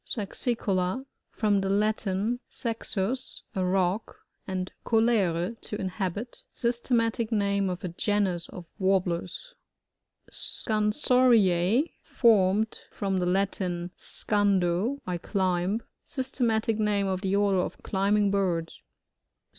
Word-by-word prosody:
Saxioola.— 210 0 -1 0.2
From 205 -3 +1
the. 195 - -1
Latin, 210 +2 +1
saxns, 230 +1 -3
a 190 - -1
rock, 185 +3 -1 0.2
and 185 -1 -3
coUre^ 220 -4 +2
to - - -5
inhabit. 195 +4 -4
Sys 235 0 0
teroatic 230 -2 +1
name 200 -2 +1
of 180 0 -5
a - - -1
genus 185 -1 0
of 180 - -9
Warb 190 -1 +3
lers. 180 - -4 0.8
SoANsoRTA' 220 - +2
— - - -42 0.2
Formed 215 -2 +4
from 195 -2 -1
the 180 - 0
Latin, 180 -2 -1
seandoj 205 +4 +1
I 180 -1 -2
climb. 190 +3 0 0.2
Systematic 230 -4 0
name 205 -2 +1
of 190 -1 -1
the 195 -1 0
order 200 -2 +3
of - - -3
climbing 200 +1 +2
birds. 175 -5 -1
200 Hz, 115 wpm, -27 LUFS, 185-225 Hz, 0.8 s, Formed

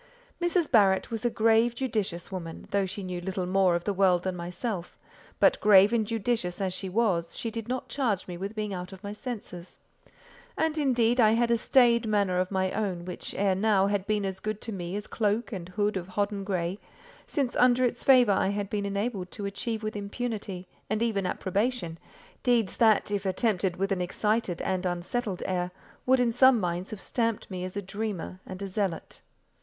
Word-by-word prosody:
Mrs. 345 -1 +1
Barrett 200 -3 +4
was 225 0 -3
a - - +4
grave, 225 +1 +3
judicious 210 -10 -2
woman, 165 -3 -6
though 200 -1 +1
she 200 +2 -5
knew 180 -1 -4
little 185 0 -3
more 185 -1 +3
of 170 - -2
the 205 - -1
world 185 -2 +3
than 185 -1 -2
myself; 180 +2 -5 0.4
but - - +4
grave 205 +1 +7
and 220 -3 +1
judicious 220 -5 -1
as 190 -2 -1
she 190 +1 -4
was, 185 -5 0
she 230 - -3
did 225 -1 -5
not 255 +1 -3
charge 230 -9 -1
me 180 - -5
with 195 +5 -5
being 210 -2 -3
out 180 0 -5
of 190 -1 -12
my 200 0 -5
senses; 210 -7 -7 0.8
and, 315 0 0
indeed, 245 -4 +2
I 220 -2 +6
had 235 +1 +2
a - - +5
staid 235 0 +4
manner 200 -4 +2
of 185 0 0
my 190 -1 0
own 190 -5 -2
which 180 - -6
ere 195 -1 +2
now 195 0 +3
had 200 -1 -1
been 210 -2 0
as 190 -1 -4
good 215 0 -3
to 230 - -4
me 180 -2 -4
as 205 0 -4
cloak 215 +2 -1
and 185 -4 -6
hood 205 +2 0
of 180 -2 -3
hodden 200 +1 -2
grey, 185 -1 -2 0.5
since 270 -4 -1
under 250 0 +4
its 245 - -2
favour 250 -5 +6
I 190 - +2
had 200 0 -2
been 205 -1 -1
enabled 200 -2 -2
to 205 - -5
achieve 220 +2 -3
with 215 0 -3
impunity, 205 -3 -4 0.2
and 215 +2 0
even 200 -5 0
approbation, 190 -3 -1 0.4
deeds 235 -6 +1
that, 220 -3 +4
if 205 -1 -1
attempted 190 -2 0
with 195 +2 -1
an 190 -2 0
excited 200 0 -1
and 185 0 -1
unsettled 180 +3 -2
air, 180 -1 -1 0.4
would 260 0 +5
in 245 -1 +3
some 255 +1 +6
minds 180 0 -2
have 210 -3 -7
stamped 230 -4 -1
me 180 -1 -4
as 185 +2 -5
a 200 - -3
dreamer 195 -2 -4
and 190 +1 -5
zealot. 190 -3 -3
200 Hz, 200 wpm, -28 LUFS, 185-225 Hz, 0.8 s, grave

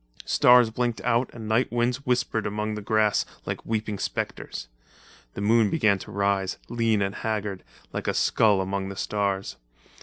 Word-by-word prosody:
Stars 125 -2 +5
blinked 120 0 -1
out 120 +1 +1
and 115 -2 -8
night 110 +4 +1
winds 120 +3 -1
whispered 120 -3 0
among 105 +1 -2
the 105 - -5
grass 110 0 +2 0.2
like - - -4
weeping 110 -2 -2
spectres. - - -4 0.7
The - - -4
moon 110 +1 +4
began 110 -11 +2
to - - -10
rise, 100 -1 0
lean 115 -3 +1
and 95 0 -2
haggard, 105 -3 -3 0.3
like - - -4
a - - 0
skull 105 -4 +3
among 95 0 -3
the 100 - -7
stars. 100 -8 -2
110 Hz, 160 wpm, -26 LUFS, 100-115 Hz, 0.7 s, Stars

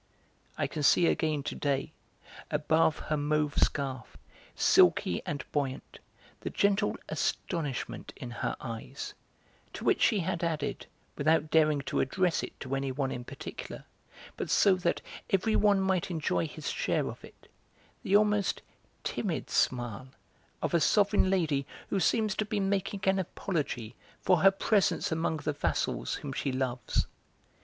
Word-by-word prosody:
I - - +1
can 155 - -4
see 170 +4 +5
again 155 -3 +1
to - - -3
day, 140 -2 -1 0.6
above 160 +1 +2
her 155 - -2
mauve 150 0 +1
scarf, 135 -3 -1 0.4
silky 90 - +4
and 145 -3 -3
buoyant, 135 -3 -3 0.4
the - - -4
gentle 200 +1 +1
astonishment 150 -7 -3
in 120 - -7
her - - -2
eyes, 115 +3 -6 0.6
to - - -7
which - - +2
she 210 -5 +4
had 170 +1 -2
added, 155 -4 -2 0.3
without 155 +1 +2
daring 155 -3 +4
to 135 - -2
address 180 +5 +1
it - - -8
to 130 0 -4
anyone 135 0 -1
in 125 - -4
particular, - - -8 0.5
but - - -3
so 200 - +5
that 175 -2 0 0.3
everyone 205 0 +3
might 190 0 +1
enjoy 150 - 0
his - - -5
share - - 0
of - - -7
it, - - -15 0.5
the 195 - +1
almost 210 -2 +1 0.4
timid - - -3
smile 120 -1 0 0.6
of - - -1
a 170 - +5
sovereign 205 +2 +3
lady 155 -8 +1 0.2
who 195 - +2
seems 215 +3 +2
to 215 - +1
be 210 0 -1
making 195 0 -1
an 190 0 +3
apology 150 - -3 0.3
for 185 - +3
her 195 +4 +7
presence 195 -1 +1
among 160 0 0
the 150 0 -2
vassals - - -1
whom 140 -2 -6
she 135 - -1
loves. 130 -2 -1
155 Hz, 145 wpm, -30 LUFS, 135-190 Hz, 0.6 s, her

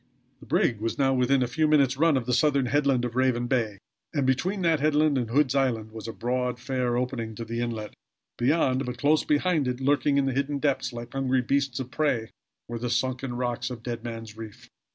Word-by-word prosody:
The - - -15
brig 115 - +1
was 115 +1 -2
now 135 -1 +3
within 130 +1 +3
a - - -1
few 155 +6 +1
minutes' 140 -3 +3
run 155 0 +3
of 125 - -2
the 125 - -1
southern 140 +1 +3
headland 135 -1 +2
of 120 -1 -5
Raven 130 -2 +2
Bay, 115 -5 0 0.4
and 140 -3 +1
between 180 +10 0
that 165 -2 +3
headland 150 0 +3
and 120 -4 -1
Hood's 135 +1 +2
Island 120 -6 0
was 110 0 -8
a - - -3
broad, 125 +1 -2
fair 125 -2 -1
opening 120 -3 -3
to 115 - -6
the 115 +1 -3
inlet 115 -3 -4 0.4
beyond; 130 0 +2
but 125 0 -4
close 150 +4 +3
behind 150 -1 +1
it, 125 0 -2
lurking 140 +1 +2
in 140 - +3
the 135 - 0
hidden 140 +2 -1
depths 135 -2 0
like 120 0 -8
hungry 130 -1 +1
beasts 135 0 0
of 130 -1 -5
prey 135 -8 0 0.4
were 120 0 -5
the 120 +1 -3
sunken 125 +1 -1
rocks 120 0 -2
of 120 -3 -8
Dead 120 -1 -4
Man's 115 -2 -7
Reef. 110 -2 -10
130 Hz, 215 wpm, -26 LUFS, 120-140 Hz, 0.4 s, now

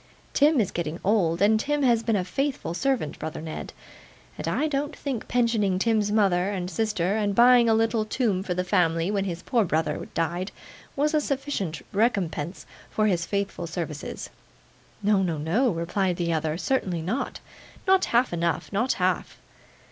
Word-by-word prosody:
Tim 295 0 +4
is 205 - +1
getting 170 0 -3
old, 185 -4 +2
and 215 +1 +4
Tim 295 +4 0
has 235 -3 +4
been 225 -1 0
a 185 -3 0
faithful 270 - -2
servant, 255 - -1
brother 155 0 -5
Ned; 160 0 -6 0.6
and - - -5
I 310 - +1
don't 290 0 -2
think 265 -6 -4
pensioning 230 -6 +1
Tim's 210 0 +1
mother 195 -3 +2
and 185 -2 -3
sister, 205 -1 0
and 205 -2 0
buying 240 0 +6
a 220 - +5
little 225 0 +2
tomb 215 -4 0
for 185 -2 -3
the 180 - 0
family 175 -1 +1
when 200 -2 0
his 175 -1 -4
poor 240 -4 +2
brother 160 -3 -1
died, 175 +3 -1 0.4
was 300 +3 +1
a 305 - +3
sufficient 260 - -3
recompense 195 -6 0 0.2
for 215 - +1
his 175 -5 +1
faithful 200 -4 -2
services.' 160 -3 -5 0.7
'No, 205 -1 +3
no, 170 -4 -1
no,' 185 - +1
replied 180 +1 -1
the 170 -1 -1
other. 155 0 -1
'Certainly 185 -8 -1
not. 215 +11 -3 0.5
Not 380 -1 +4
half 240 -3 +2
enough, 170 +3 -1
not 235 +6 +2
half. - - -1
200 Hz, 170 wpm, -26 LUFS, 170-235 Hz, 0.7 s, buying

